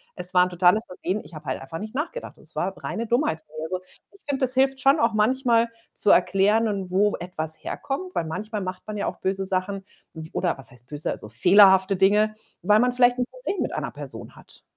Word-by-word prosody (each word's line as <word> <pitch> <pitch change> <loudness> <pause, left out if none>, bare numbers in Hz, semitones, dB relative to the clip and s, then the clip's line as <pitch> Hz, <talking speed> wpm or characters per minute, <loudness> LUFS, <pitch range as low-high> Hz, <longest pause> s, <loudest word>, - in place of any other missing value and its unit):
„Es 180 0 -6
war 180 -1 +6
‘n 180 - -1
totales 180 +4 +3
Versehen.” 185 +3 -3
Ich - - -15
habe 155 -1 -10
halt 130 - -3
einfach 150 +5 -6
nicht 215 +4 -8
nachgedacht. 415 - -4
Das - - -17
war - - -2
reine 230 0 -3
Dummheit 240 - +1
von 155 0 -22
mir, 155 - -5
also, 185 +3 -3 0.3
ich 400 - -20
finde, 270 -1 -1
das 255 0 +2
hilft 265 0 +2
schon 275 +4 +4
auch 230 -1 +2
manchmal 235 +1 +2 0.2
zu 205 - +3
erklären 195 +2 +3
wo 205 +2 +2
etwas 160 -3 -5
herkommt, 360 +7 -4
weil 165 - -1
manchmal 210 +7 -4
macht 185 -1 -6
man 215 - -5
ja 200 - -2
auch - - -5
böse 190 0 -1
Sachen. 190 +1 -2 0.3
F 160 -1 -8
oder 175 -5 0
was 130 -4 -10
heißt 120 0 -14
böse, 150 0 -4
also, 105 - -8
fehlerhafte 190 - +6
Dinge, 210 +3 +3 0.3
weil 210 +1 +4
man 250 0 +3
vielleicht 245 0 +3
‘n 250 - +1
Problem - - -4
mit - - -1
einer - - -3
Person - - -8
hat. - - -16
200 Hz, 225 wpm, -24 LUFS, 180-235 Hz, 0.3 s, war